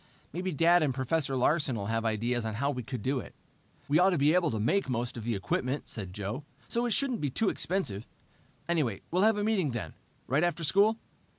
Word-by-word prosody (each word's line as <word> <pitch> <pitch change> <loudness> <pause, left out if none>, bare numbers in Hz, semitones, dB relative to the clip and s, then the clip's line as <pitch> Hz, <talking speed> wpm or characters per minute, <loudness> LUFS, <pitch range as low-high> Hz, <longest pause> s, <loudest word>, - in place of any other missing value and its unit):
Maybe 185 +3 -2
Dad 170 +3 +4
and 140 -5 +1
Professor 135 +1 0
Larsen 140 0 +2
will 100 -3 -3
have 115 +2 -1
ideas 115 +2 0
on 110 -1 -3
how 140 +6 0
we 125 -3 -4
could 125 -3 -6
do 135 0 0
it." - - -10 0.5
"We 150 +3 +3
ought 185 +2 +6
to 180 - +1
be 145 +2 +4
able 175 -3 +3
to 110 - -2
make 135 - +1
most 120 -1 -2
of 115 -2 -6
the 115 -2 0
equipment," 125 +8 -2
said 95 -5 -4
Joe, 105 +8 -4 0.2
"so 235 +1 0
it - - -2
shouldn't 260 -3 0
be 145 - 0
too 200 - +1
expensive. 120 - -2 0.6
Anyway, 150 - 0
we'll 180 +2 +2
have 220 +1 +4
a 205 - 0
meeting 205 -8 +1
then, 120 - -4 0.3
right 140 +6 +1
after 175 -1 0
school?" 200 +7 +4
140 Hz, 220 wpm, -30 LUFS, 115-175 Hz, 0.6 s, ought